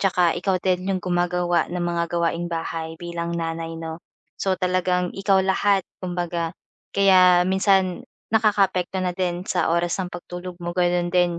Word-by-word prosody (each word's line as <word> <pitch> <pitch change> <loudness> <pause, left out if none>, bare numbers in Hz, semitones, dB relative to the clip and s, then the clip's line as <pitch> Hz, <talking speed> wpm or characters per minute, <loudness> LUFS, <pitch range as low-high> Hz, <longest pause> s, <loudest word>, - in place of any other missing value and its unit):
'tsaka 180 -3 +2
ikaw 190 -2 +1
din 185 0 0
'yong 190 -2 -1
gumagawa 175 -1 +1
ng 175 0 -3
mga 170 -1 0
gawaing 170 0 0
bahay 165 -1 -4
bilang 170 0 -4
nanay 165 0 -3
'no. 160 0 -6 0.4
So 190 -1 +1
talagang 180 0 0
ikaw 195 -1 +2
lahat 195 +1 +2 0.2
kumbaga 175 -2 -2 0.4
kaya 185 -2 +6
minsan 190 -1 +2 0.3
nakakaapekto 195 -4 +2
na 180 - 0
din 180 -1 -2
sa - - 0
oras 170 0 +1
ng 180 -1 -4
pagtulog 175 0 -7
mo 175 - -3
gano'n 175 -1 +1
din 175 -1 +2
180 Hz, 155 wpm, -23 LUFS, 170-185 Hz, 0.4 s, kaya